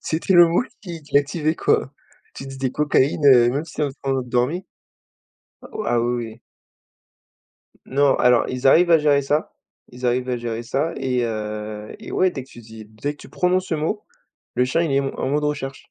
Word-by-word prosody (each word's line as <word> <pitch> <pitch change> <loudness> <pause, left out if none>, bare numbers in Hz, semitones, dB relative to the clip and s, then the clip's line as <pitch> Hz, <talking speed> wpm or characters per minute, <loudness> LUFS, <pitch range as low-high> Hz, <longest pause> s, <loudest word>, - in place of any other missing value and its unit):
c'était 170 +4 -1
le 175 -1 +8
mot 170 +8 +2 0.2
qui 170 -5 -8
qui 145 - -17
l'activait, 150 +2 +2
quoi. 135 - +1 0.4
Tu 135 - -8
disais 135 -1 -3
«cocaïne», 145 0 +1
heu, 120 -3 +7
même 140 +5 -1
s'il 155 - -5
était 135 - -7
en - - -49
train 135 - 0
de 125 - -12
dormait. 130 +10 0 1.2
Ah, 120 -1 +2
oui, 120 +1 0
oui. 110 +2 -13 1.5
Non 140 +1 +3
alors 125 -1 +3
ils 130 +1 -2
arrivent 170 +5 +5
à 165 - +7
gérer 145 -2 +3
ça, 145 +3 -1 0.4
ils 125 +1 -6
arrivent 125 +1 0
à 125 - 0
gérer 115 -1 -4
ça 140 +8 -1
et 130 -2 -1
heu, 105 -1 -5
et 225 - -10
ouais 185 - +3
dès 135 -6 -6
que 135 - -24
tu 120 - -13
dis 110 -1 -12
dès 110 +7 -5
que 150 - -20
tu - - -13
prononces 185 +1 0
ce 165 - -2
mot, 160 +7 -2 0.5
le 125 - +2
chien 130 +6 0
il 155 -5 -1
est - - +2
m 135 -1 +1
en - - -1
mode 150 +2 0
recherche. 140 -2 -4
135 Hz, 210 wpm, -22 LUFS, 125-155 Hz, 1.5 s, le